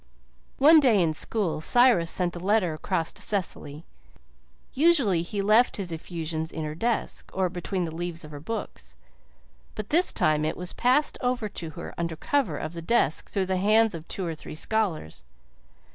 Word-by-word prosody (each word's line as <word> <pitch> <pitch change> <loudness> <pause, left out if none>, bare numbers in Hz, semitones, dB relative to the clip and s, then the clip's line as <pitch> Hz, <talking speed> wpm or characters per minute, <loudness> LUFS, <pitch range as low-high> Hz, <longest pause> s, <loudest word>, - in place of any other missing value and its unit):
One 310 +4 +7
day 245 -8 +4
in 165 -3 +2
school 175 -1 -1
Cyrus 240 -5 +4
sent 180 -2 0
a - - -5
letter 190 -2 +1
across 165 +1 -2
to - - -11
Cecily. 165 -6 -3 0.9
Usually 270 - +3
he 195 +4 -3
left 215 +4 +4
his 190 -4 -4
effusions 160 -1 -4
in 160 - -5
her 150 - -4
desk, 230 +8 -2
or 190 -1 +1
between 180 +1 -3
the 160 -2 -4
leaves 170 -1 -5
of 155 - -12
her 145 - -8
books; 225 +10 -6 0.8
but 215 -1 -6
this 345 +4 +4
time 155 -1 +1
it 155 - -2
was 180 0 -4
passed 255 +5 +1
over 245 -3 -1
to 170 -5 -5
her 170 - -7
under 170 -1 -2
cover 205 - -1
of 155 - -5
the 170 - -6
desk 165 - +1
through 195 -2 -1
the 185 0 -1
hands 215 +3 +3
of 165 -1 -8
two 190 - -2
or 165 - -3
three 155 - -9
scholars. 175 - -2
180 Hz, 180 wpm, -26 LUFS, 165-220 Hz, 0.9 s, One